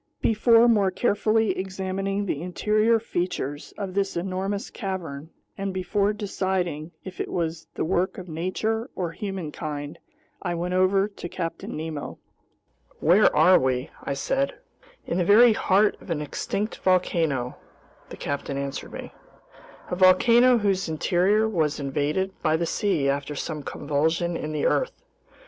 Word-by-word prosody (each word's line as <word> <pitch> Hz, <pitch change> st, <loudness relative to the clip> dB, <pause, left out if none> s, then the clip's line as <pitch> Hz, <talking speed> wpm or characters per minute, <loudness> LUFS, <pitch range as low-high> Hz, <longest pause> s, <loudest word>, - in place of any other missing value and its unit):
Before 230 Hz, +1 st, +5 dB
more 205 Hz, -5 st, +4 dB
carefully 215 Hz, +2 st, +1 dB
examining 190 Hz, +1 st, -2 dB
the 150 Hz, -6 st, -2 dB
interior 215 Hz, +6 st, +2 dB
features 175 Hz, -8 st, -3 dB
of 195 Hz, -3 st, -4 dB
this 195 Hz, -2 st, -1 dB
enormous 195 Hz, +3 st, -3 dB
cavern, 165 Hz, -7 st, -5 dB, 0.3 s
and 195 Hz, 0 st, -2 dB
before 195 Hz, +2 st, 0 dB
deciding 190 Hz, -6 st, -2 dB
if 185 Hz, -1 st, -6 dB
it -, -, -4 dB
was 165 Hz, -1 st, -3 dB
the -, -, -1 dB
work 185 Hz, +2 st, 0 dB
of 185 Hz, -, -8 dB
nature 215 Hz, -, -2 dB
or 175 Hz, -3 st, -2 dB
humankind, 155 Hz, -6 st, -5 dB, 0.4 s
I 175 Hz, -2 st, -2 dB
went 175 Hz, +2 st, -2 dB
over 190 Hz, +2 st, +3 dB
to 200 Hz, -4 st, -8 dB
Captain 165 Hz, -3 st, -5 dB
Nemo. 155 Hz, -2 st, -5 dB, 0.8 s
"Where 185 Hz, +6 st, +5 dB
are 185 Hz, 0 st, +6 dB
we?" 130 Hz, 0 st, -1 dB
I 140 Hz, -, -2 dB
said. 270 Hz, -, -1 dB, 0.5 s
"In 175 Hz, -, -1 dB
the -, -, +3 dB
very 220 Hz, +5 st, +7 dB
heart 205 Hz, +1 st, +2 dB
of -, -, -14 dB
an 165 Hz, -3 st, -1 dB
extinct 195 Hz, +8 st, -3 dB
volcano," 165 Hz, -8 st, +1 dB, 0.5 s
the -, -, -9 dB
captain 140 Hz, -1 st, -3 dB
answered 140 Hz, 0 st, -5 dB
me, -, -, -7 dB, 0.8 s
"a -, -, 0 dB
volcano 235 Hz, +7 st, +6 dB
whose 195 Hz, -5 st, 0 dB
interior 185 Hz, +7 st, +2 dB
was 160 Hz, -9 st, 0 dB
invaded 145 Hz, +7 st, -1 dB
by 155 Hz, +1 st, +2 dB
the 170 Hz, -, -1 dB
sea 175 Hz, -6 st, 0 dB
after 140 Hz, +1 st, -1 dB
some 150 Hz, +1 st, -4 dB
convulsion 160 Hz, +5 st, -1 dB
in 155 Hz, -1 st, -4 dB
the 150 Hz, -1 st, -1 dB
earth. -, -, 0 dB
185 Hz, 145 wpm, -25 LUFS, 155-200 Hz, 0.8 s, very